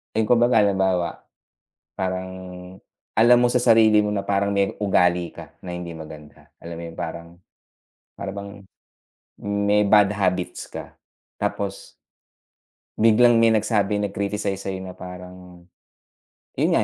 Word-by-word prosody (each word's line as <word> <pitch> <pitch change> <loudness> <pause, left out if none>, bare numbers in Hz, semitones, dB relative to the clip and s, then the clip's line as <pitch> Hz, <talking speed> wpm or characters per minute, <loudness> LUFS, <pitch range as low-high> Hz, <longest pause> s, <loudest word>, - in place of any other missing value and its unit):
Ay, 110 -1 +1
kumbaga 120 -1 +4
halimbawa, 95 -3 0 0.7
parang 95 0 -3 0.9
alam 120 +3 +6
mo 120 - +4
sa 120 - 0
sarili 110 -3 +5
mo 105 - -1
na 100 - -1
parang 100 0 0
may 100 -1 0
ugali 90 -4 +1
ka - - -12
na 90 - -6
hindi 85 -1 -6
maganda. 75 -1 -12
Alam 85 0 -8
mo 85 - -7
yung - - -17
parang, 85 0 -6 0.9
para 95 - -5
bang 100 0 -9 0.8
may 100 0 +1
bad 105 0 +4
habits 90 -3 -2
ka. - - -9 0.4
Tapos 100 -1 -4 1.1
Biglang 115 +1 +5
may 115 - +5
nagsabi, 110 -2 +1
nag-criticize 100 -1 -2
sa 100 - -6
'yo 95 -1 -4
na 95 - -7
parang, 90 -1 -11 0.9
yun - - +1
nga, - - +3
100 Hz, 135 wpm, -23 LUFS, 90-105 Hz, 1.1 s, alam